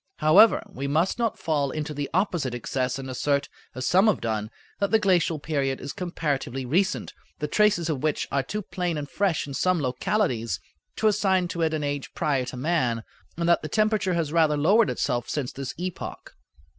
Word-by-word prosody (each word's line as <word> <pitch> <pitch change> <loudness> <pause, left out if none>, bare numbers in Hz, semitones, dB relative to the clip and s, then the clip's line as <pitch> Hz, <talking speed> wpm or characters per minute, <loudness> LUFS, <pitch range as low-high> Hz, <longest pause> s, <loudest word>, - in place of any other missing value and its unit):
However, 170 +7 +6
we 135 +2 -5
must 160 +10 +1
not 230 -2 0
fall 145 -4 0
into 150 +2 -4
the 145 -1 -3
opposite 170 - 0
excess 125 +1 -2
and 135 -1 -6
assert, 140 +2 0 0.3
as 130 0 -3
some 190 +4 +4
have 215 - +3
done, 110 -2 -2 0.3
that 200 - +1
the 220 - +5
glacial 180 -6 +2
period 140 -3 -1
is 140 - -6
comparatively 145 -7 -3
recent, 185 +10 0 0.2
the 150 - -2
traces 200 -2 +3
of 150 -6 -2
which 155 -1 0
are 140 - +2
too 210 +9 -4
plain 175 -3 -2
and 145 -1 -4
fresh 190 0 0
in 140 - -7
some 185 +5 +1
localities 125 - 0 0.4
to 220 - +2
assign 190 -3 +2
to 170 - -3
it 160 -1 +2
an 150 - -2
age 145 -1 -4
prior 135 -4 0
to 130 - -7
man, 125 -6 0 0.3
and 170 0 0
that 170 - +4
the 155 - -5
temperature 215 -4 +1
has 160 -3 -1
rather 155 -3 +3
lowered 200 +10 +4
itself 120 -1 -1
since 140 -4 -2
this 135 -1 -6
epoch. 180 +1 -6
155 Hz, 195 wpm, -25 LUFS, 135-185 Hz, 0.4 s, However